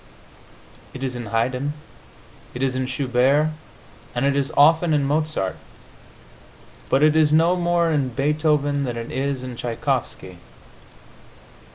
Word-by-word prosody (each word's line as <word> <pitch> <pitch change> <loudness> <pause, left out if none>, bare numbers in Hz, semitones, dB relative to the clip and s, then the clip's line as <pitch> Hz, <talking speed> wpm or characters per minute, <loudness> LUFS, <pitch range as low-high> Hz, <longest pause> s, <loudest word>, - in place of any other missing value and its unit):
It 130 - -6
is 130 -2 -3
in 120 -3 -6
Haydn, 125 +6 -1 0.8
it 125 - -3
is 130 -1 0
in 130 0 -2
Schubert 135 +3 +2 0.7
and 120 +2 0
it 140 0 +2
is 140 +1 -1
often 160 +2 +5
in 145 - +1
Mozart, 150 -9 -1 1.3
but 135 +2 +3
it 155 0 +4
is 155 -2 +4
no 165 +3 +4
more 175 -1 +1
in 140 -4 0
Beethoven 145 +1 0
than 120 -3 -3
it 115 0 -6
is 135 -1 -2
in 125 -1 -6
Tschaikovsky. 115 -6 -3
140 Hz, 135 wpm, -22 LUFS, 125-155 Hz, 1.3 s, often